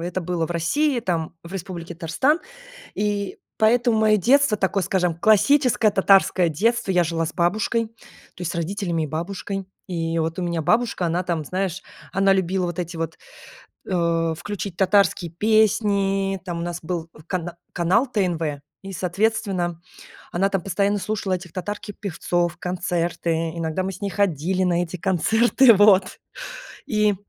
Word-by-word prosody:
это 175 +2 -3
было 170 -2 -2
в - - -11
России, 245 - +1
там, 165 -6 -2
в 170 - -10
Республике 175 -2 -6
Татарстан. 190 - +1 0.5
И 205 -1 -2 0.2
поэтому 230 +1 +3
мое 215 -1 +5
детство 255 +3 +4
такое, 195 0 0
скажем, 180 -2 0
классическое 220 - +4
татарское 195 -2 +4
детство. 230 +7 0
Я 180 -2 +3
жила 165 0 -1
с 160 - -5
бабушкой, 215 +6 +1
то 220 - -20 0.5
есть 175 -2 -3
с - - -8
родителями 170 -1 -2
и - - -3
бабушкой. 190 +5 -4 0.2
И 165 -3 -2
вот 165 +2 -2
у - - -1
меня 170 -2 -1
бабушка, 215 +1 +1
она 170 +2 0
там, 170 -3 -2
знаешь, 190 +3 -3 0.3
она 195 0 +3
любила 190 -1 0
вот 175 0 -5
эти 170 0 -5
вот, 165 -1 -4 0.7
э, 170 -2 +1
включить 195 -1 -5
татарские 190 -3 +2
песни. 200 -1 +2
Там 175 -2 -4
у - - -3
нас 175 0 -4
был 165 0 -4 0.2
кан 175 -2 -3 0.2
канал 185 +10 +2
ТНВ 170 - -1 0.2
и, 195 - -7
соответственно, 185 -2 -1 0.5
она 195 +3 +1
там 195 -2 -1
постоянно 200 +2 +1
слушала 205 -1 -2
этих 175 -2 -5
татарки 205 +3 -5
певцов, 175 -3 -1
концерты, 175 -1 -2 0.2
иногда 165 +2 -2
мы 190 - -2
с 190 - -11
ней 200 - -1
ходили 185 -1 0
на 175 -1 +2
эти 175 +1 -6
концерты, 220 - +4
вот 200 -2 +4 0.7
и 210 -1 +2
185 Hz, 155 wpm, -23 LUFS, 170-205 Hz, 0.7 s, мое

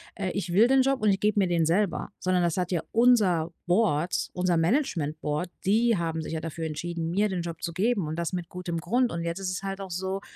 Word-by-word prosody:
„Äh, 195 -3 -2
ich 180 -2 -3
will 215 +6 +6
den 265 +1 +4
Job 270 0 +1
und 215 - +3
ich 195 -1 +2
gebe 210 0 +2
mir 190 - +3
den 170 -2 +2
selber.“ 175 +1 0
Sondern 185 -1 +1
das 170 0 0
hat 180 -1 -1
ja 175 -3 0
unser 210 -9 +3
Board 180 -3 +1
unser 180 -1 +1
Management 165 - 0
Board, 150 +4 -2 0.2
die 225 +4 +3
haben 165 -1 -2
sich 160 - -6
ja 160 - -1
dafür 165 0 -5
entschieden, 165 +1 -3
mir 205 +4 +2
den 185 -2 -2
Job 170 -1 -6
zu 170 - -3
geben 200 -1 +1
und 155 - -3
das 170 +1 -2
mit 175 -2 -4
gutem 180 -2 -4
Grund. 240 +8 +1
Und 170 0 -3
jetzt 170 +2 -3
ist 190 -1 -2
es 185 - -4
halt 195 0 -4
auch 190 -1 -7
so 190 +2 -3
180 Hz, 250 wpm, -27 LUFS, 170-200 Hz, 0.2 s, will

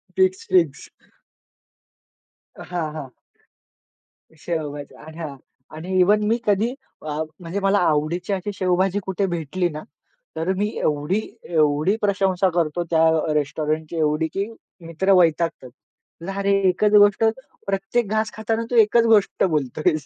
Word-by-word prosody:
Fix, 185 0 +1
fix. 165 -7 +2 1.7
हां, 170 -4 -4
हां. 140 -4 -7 1.3
शेवभाजी 150 -3 -5
आणा. 155 -3 -7 0.4
आणि 185 +4 -3
इव्हन 210 +3 +4
मी 225 +2 +2
कधी 210 +4 +1 0.3
अ, 155 - -10 0.3
म्हणजे 180 +2 -4
मला 195 +1 +2
आवडीची 165 +5 -1
अशी 195 +2 -3
शेवभाजी 185 +1 +1
कुठे 190 +1 -1
भेटली 175 +1 -2
ना, 155 0 -7 0.5
तर 165 +4 -1
मी 205 +1 +1
एवढी, 150 +7 0 0.2
एवढी 155 +3 +2
प्रशंसा 195 -2 +1
करतो, 170 0 0
त्या 160 -1 +3 0.3
रेस्टॉरंटची 155 +2 -2
एवढी, 155 +1 +1
की 195 +5 -3 0.4
मित्र 190 +4 +1
वैतागतात. 165 -6 +1 0.6
"जारे 200 +1 -1 0.2
एकच 205 +3 +1
गोष्ट, 205 +1 +5 0.4
प्रत्येक 195 +4 -1
घास 220 +1 0
खाताना, 225 +1 -2
तू 245 - 0
एकच 230 +1 +5
गोष्ट 220 -3 +3
बोलतो 155 -6 -1
आहेस." 155 -3 -3
180 Hz, 125 wpm, -22 LUFS, 155-200 Hz, 1.7 s, गोष्ट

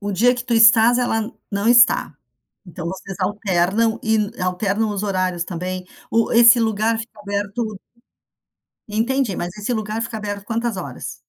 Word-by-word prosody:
O 205 -1 -3
dia 245 +6 +3
que 245 0 -6
tu 240 -1 -1
estás, 225 +1 +6
ela 225 -2 -1 0.2
não 200 +2 -1
está. 240 +1 +4 0.5
Então 175 -1 -7
vocês 190 +1 -7
alternam 200 +3 0
e 220 -1 +1 0.2
alternam 200 +4 -1
os 205 -1 -3
horários, 185 -3 -1
também. 180 +1 -5 0.2
O 230 0 +1
esse 235 +1 +7
lugar 220 0 0
fica 225 -1 -9
aberto 205 +1 -4 1.1
Entendi, 230 +1 -1
mas 175 - -3
esse 210 +4 -2
lugar 215 0 -3
fica 230 -1 -4
aberto 205 -1 -5
quantas 230 0 -2
horas? 140 -8 -7
215 Hz, 155 wpm, -20 LUFS, 195-230 Hz, 1.1 s, esse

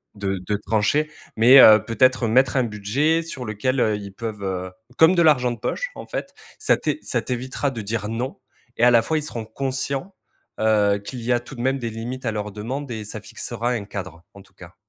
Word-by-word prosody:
de 95 -2 -2
de 105 - +1
trancher, 145 +8 +1 0.2
mais 125 +5 +8
heu, 110 -5 +9
peut-être 130 +1 +2
mettre 130 +4 +3
un 130 - +3
budget 120 +10 0
sur 140 -6 -7
lequel, 125 +5 -1
heu, 110 -3 +2
ils 100 -1 -8
peuvent, 110 -1 -6
heu 95 -1 -3 0.3
comme 160 +3 +6
de 170 - +4
l'argent 135 -7 +4
de 120 - -6
poche - - -3
en - - -9
fait, - - -5 0.2
ça - - +2
t'é - - -2
ça 120 - -1
t'évitera 130 +3 -3
de 115 -4 -5
dire: 105 0 -3
«Non» 120 +4 -4 0.4
et - - +2
à 125 - +7
la 120 -1 +6
fois, 160 +8 -1
ils 155 - -2
seront 120 -6 -5
conscients, 135 - -3 0.4
heu, 105 -2 +3
qu'il 120 +5 -8
y 120 - -1
a 120 - +2
tout 120 +4 -12
de 120 - -6
même 135 +2 0
des 120 -2 -3
limites 120 +4 -6
à - - +1
leurs 105 -1 -4
demandes 130 +7 -5
et 110 -2 -5
ça 105 - -5
fixera 120 - -4
un 115 -5 -2
cadre 95 -4 -7
en 100 - -12
tout - - -26
cas. 90 0 -14
115 Hz, 225 wpm, -22 LUFS, 105-130 Hz, 0.4 s, heu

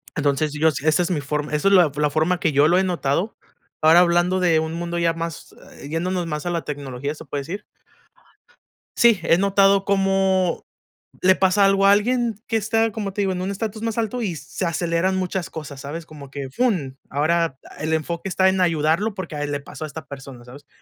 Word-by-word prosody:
Entonces, 145 +1 0
yo 155 +1 +3
si 145 +1 -6
esa 155 +2 +3
es 175 - -2
mi 150 -4 0
forma 150 +1 -3
esa 150 +6 +2
es - - +3
la 180 -5 +6
la 150 0 +1
forma 160 +4 +1
que 160 - +2
yo 145 +1 +4
lo 175 +3 +4
he 190 - +2
notado. 175 +2 -1 0.4
Ahora 160 +2 +7
hablando 175 +1 +2
de 165 -3 +3
un 160 +1 -3
mundo 170 0 -3
ya 170 -1 +2
más, 165 -1 -6 0.2
eh, 140 - -10
yéndonos 175 +3 -2
más 150 +1 -4
a - - -1
la 170 -1 -2
tecnología, 140 0 -5
se - - -11
puede 140 -1 -4
decir 195 +8 -6 1.4
sí, 230 -6 +5
he 165 - +4
notado 195 0 +3
como 195 -2 +1 0.6
le 185 0 +7
pasa 195 +1 +3
algo 195 0 +4
a - - +7
alguien 235 +2 +2
que 225 - 0
está, 225 +1 +1
como 205 -2 -4
te 205 - -3
digo, 195 - +1
en 180 -1 -3
un 185 - -2
estatus 215 +2 -4
más 225 0 -3
alto 230 +2 -1
y 185 -7 -2
se 145 +6 -5
aceleran 170 +2 0
muchas 185 -1 -2
cosas, 145 -3 -8
¿sabes? 155 +4 -6
Como 145 -3 -12
que, 135 -1 -6
fun, 150 - -1
ahora 155 0 0 0.2
el 155 +1 -1
enfoque 170 +4 -2
está 190 +1 +3
en 190 0 0
ayudarlo 170 +5 +1
porque 170 -5 -6
a 145 - -3
él 145 - -3
le 145 - -2
pasó 155 - -9
a - - -6
esta 155 +2 -9
persona, 135 -3 -10
¿sabes? 140 +3 -13
170 Hz, 220 wpm, -22 LUFS, 150-195 Hz, 1.4 s, Ahora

